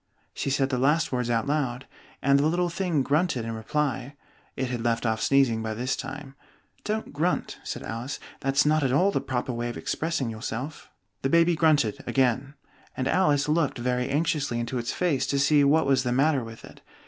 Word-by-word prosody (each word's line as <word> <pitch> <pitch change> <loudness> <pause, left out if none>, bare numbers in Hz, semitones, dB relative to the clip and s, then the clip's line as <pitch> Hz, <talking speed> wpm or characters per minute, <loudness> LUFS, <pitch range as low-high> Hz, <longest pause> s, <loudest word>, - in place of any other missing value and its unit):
She - - -3
said 135 0 +1
the 125 - 0
last 145 +5 +2
words 125 -2 -1
out 115 -1 +1
loud, 135 -4 -1 0.4
and 140 +1 +4
the 145 - +3
little 175 +2 +1
thing 170 -5 0
grunted 145 -4 +1
in 115 - -3
reply 130 +3 -2 0.4
(it 130 -2 -2
had 120 -2 -3
left 115 0 0
off 110 -1 0
sneezing 135 -5 +3
by 110 0 -3
this 125 +4 -1
time). 135 +1 -7 0.5
"Don't 215 -4 -3
grunt," 165 +5 -1
said - - -5
Alice: 115 +5 -5 0.2
"that's 135 +2 +2
not 155 +1 +3
at 135 -3 +1
all 180 +9 +3
the - - -1
proper 125 0 -2
way 120 0 -3
of 120 - -6
expressing 155 -7 -2
yourself." 115 +6 -6 0.3
The 135 - 0
baby 170 +2 +4
grunted 150 -9 +2
again, 130 +2 +1 0.4
and 130 - -1
Alice 145 -4 +2
looked 155 -2 +1
very 125 +1 -1
anxiously 145 -4 0
into 120 +2 -2
its 120 - -3
face 170 -7 0
to 140 - 0
see 145 +1 +4
what 150 +2 +4
was 135 -1 +3
the 125 -1 -1
matter 135 +1 +2
with 115 0 -10
it. - - -15
135 Hz, 195 wpm, -26 LUFS, 125-150 Hz, 0.5 s, and